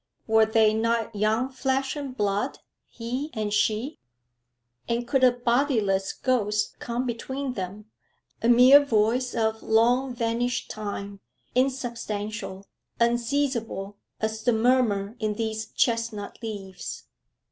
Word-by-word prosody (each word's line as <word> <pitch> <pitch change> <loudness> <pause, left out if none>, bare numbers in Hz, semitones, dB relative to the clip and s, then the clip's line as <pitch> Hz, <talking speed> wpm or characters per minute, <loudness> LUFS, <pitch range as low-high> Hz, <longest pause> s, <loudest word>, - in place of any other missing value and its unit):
Were 220 -1 +4
they 220 -1 +4
not 230 0 0
young 220 +5 +1
flesh 265 +1 -1
and 275 -3 -6
blood, 205 -1 0 0.3
he 250 +5 -4
and 210 -1 -2
she? 215 +6 0 0.9
And 235 +1 -1
could 265 +1 +1
a 255 - +7
bodiless 235 -6 +1
ghost 210 -5 0
come 240 +2 -3
between 260 +3 -3
them, 195 0 -6 0.6
a 230 - +2
mere 255 +4 +8
voice 245 0 +1
of 220 -1 0
long 245 +3 +2
vanished 235 +1 -1
time, 200 -1 -5 0.3
insubstantial, 225 -6 -2 0.3
unseizable, 235 -4 0 0.2
as 220 0 -2
the 245 - +3
murmur 220 -3 +2
in 215 -1 -1
these 220 0 -3
chestnut 230 -3 -1
leaves? 200 -5 -6
230 Hz, 115 wpm, -26 LUFS, 215-250 Hz, 0.9 s, mere